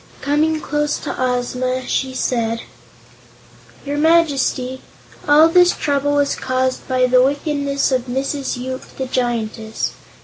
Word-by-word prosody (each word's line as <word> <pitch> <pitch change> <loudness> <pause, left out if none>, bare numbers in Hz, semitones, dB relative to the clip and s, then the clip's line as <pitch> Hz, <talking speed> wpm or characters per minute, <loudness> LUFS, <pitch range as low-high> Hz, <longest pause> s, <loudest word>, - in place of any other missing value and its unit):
Coming 310 +2 +1
close 295 -1 -1
to - - -5
Ozma, 255 0 -1
she 260 -1 -1
said: 230 -3 -1 1.2
"Your 290 +1 -2
Majesty, 280 -5 +2 0.5
all 300 +2 +7
this 355 +1 +5
trouble 285 0 0
was 285 -1 +1
caused 255 0 -1
by 255 -1 +2
the 250 0 +4
wickedness 280 0 0
of 255 -1 0
Mrs. 270 +2 -2
Yoop, 260 +1 -5 0.2
the 265 - -2
Giantess. 230 -3 -2
265 Hz, 125 wpm, -19 LUFS, 255-290 Hz, 1.2 s, all